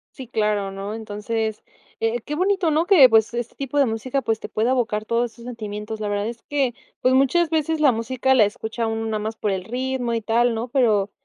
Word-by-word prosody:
Sí, 260 Hz, -3 st, -8 dB
claro, 210 Hz, -3 st, 0 dB
¿no? 195 Hz, +2 st, -5 dB
Entonces, 220 Hz, 0 st, -3 dB, 0.4 s
eh, 225 Hz, +1 st, 0 dB
qué 290 Hz, -, -6 dB
bonito, 375 Hz, 0 st, +1 dB
¿no?, 315 Hz, +3 st, +2 dB
que, 335 Hz, -11 st, +8 dB
pues, 225 Hz, 0 st, +3 dB
este 240 Hz, -1 st, -4 dB
tipo 275 Hz, +1 st, -4 dB
de 280 Hz, -, +5 dB
música, 250 Hz, +4 st, -2 dB
pues, 225 Hz, -1 st, 0 dB
te -, -, -8 dB
pueda 225 Hz, +4 st, 0 dB
evocar 220 Hz, -4 st, 0 dB
todos 235 Hz, 0 st, 0 dB
esos 235 Hz, 0 st, -14 dB
sentimientos. 215 Hz, -2 st, -6 dB
La 210 Hz, -, -3 dB
verdad 205 Hz, 0 st, -1 dB
es 235 Hz, 0 st, -7 dB
que, 275 Hz, -4 st, +1 dB, 0.3 s
pues, 255 Hz, -, +3 dB
muchas 275 Hz, +6 st, +3 dB
veces 320 Hz, 0 st, 0 dB
la 295 Hz, -3 st, +5 dB
música 250 Hz, +3 st, 0 dB
la 235 Hz, -5 st, +6 dB
escucha 220 Hz, +2 st, -3 dB
uno 225 Hz, 0 st, -2 dB
nada 220 Hz, -1 st, -2 dB
más 220 Hz, +1 st, -4 dB
por 210 Hz, -2 st, -1 dB
el 190 Hz, -1 st, -2 dB
ritmo, 250 Hz, +2 st, -2 dB
y 230 Hz, -, -1 dB
tal, 230 Hz, +2 st, +2 dB
¿no?, 230 Hz, +2 st, -3 dB
pero 215 Hz, -6 st, +2 dB
230 Hz, 225 wpm, -22 LUFS, 215-260 Hz, 0.4 s, que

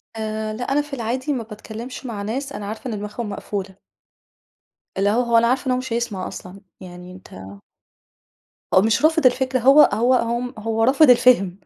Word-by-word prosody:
آآ، 215 Hz, 0 st, -4 dB
لأ، 230 Hz, +3 st, -5 dB
أنا 290 Hz, +2 st, +2 dB
في 295 Hz, -1 st, -12 dB
العادي 255 Hz, +3 st, -2 dB
ما 245 Hz, -4 st, -3 dB
باتكلّمش 225 Hz, +4 st, -9 dB
مع 225 Hz, -5 st, -5 dB
ناس 265 Hz, +7 st, -4 dB
أنا 205 Hz, -, -6 dB
عارفة 220 Hz, +5 st, -7 dB
إن -, -, -4 dB
دماغهم 210 Hz, +2 st, -6 dB
مقفولة. 200 Hz, -1 st, -6 dB, 1.2 s
اللي 200 Hz, +1 st, +2 dB
هو، 225 Hz, +4 st, +2 dB
هو 235 Hz, -1 st, +2 dB
أنا 230 Hz, 0 st, +4 dB
عارفة 255 Hz, +3 st, 0 dB
إن -, -, +1 dB
هو 250 Hz, -, +1 dB
مش 255 Hz, -2 st, -5 dB
هيسمَع 230 Hz, -6 st, -3 dB
أصلًا، 190 Hz, +2 st, -10 dB, 0.2 s
يعني 180 Hz, 0 st, -11 dB
أنت 185 Hz, +1 st, -14 dB, 1.4 s
هو 185 Hz, -, +6 dB
مش 225 Hz, +7 st, +1 dB
رافِض 320 Hz, -2 st, +2 dB
الفكرة، 255 Hz, +1 st, +2 dB
هو 270 Hz, +5 st, +6 dB
هو 235 Hz, 0 st, +1 dB
م 250 Hz, +1 st, -6 dB
هو 225 Hz, +1 st, -1 dB
رافِض 270 Hz, +4 st, +5 dB
الفِهم 235 Hz, -7 st, +4 dB
230 Hz, 185 wpm, -21 LUFS, 210-255 Hz, 1.4 s, هو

